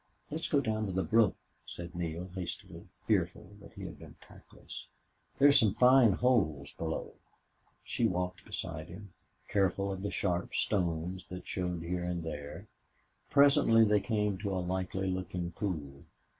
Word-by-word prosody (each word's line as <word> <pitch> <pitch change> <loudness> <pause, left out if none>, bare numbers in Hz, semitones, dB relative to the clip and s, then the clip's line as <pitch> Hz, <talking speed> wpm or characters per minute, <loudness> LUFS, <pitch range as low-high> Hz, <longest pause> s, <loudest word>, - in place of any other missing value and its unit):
"Let's 160 +2 -2
go 140 - +3
down 110 -4 -1
the 95 - +1
brook," 110 -3 +4 0.3
said 85 0 -8
Neale, 85 +1 -4
hastily, 95 -2 -6 0.2
fearful 90 - 0
that - - -14
he - - -9
had - - -7
been - - -12
tactless. - - -12 0.5
"There 140 - +7
are - - +8
some 110 -8 +5
fine 125 -4 +6
holes 85 - +1
below." 80 -1 -4 0.7
She 115 - +1
walked 90 -2 -2
beside 80 -1 -5
him, 95 +2 -11 0.3
careful 100 0 +1
of 95 - -6
the 100 - -2
sharp 90 -3 -1
stones 90 -1 -1
that 90 0 -7
showed 90 -2 -2
here 90 +1 -2
and 90 -1 -2
there. 75 -2 -6 0.6
Presently 140 -5 +6
they 105 -1 +4
came 105 -2 0
to 100 -2 -2
a - - 0
likely 95 +1 -2
looking 90 -2 -3
pool. 75 -8 -4
95 Hz, 155 wpm, -32 LUFS, 85-105 Hz, 0.7 s, are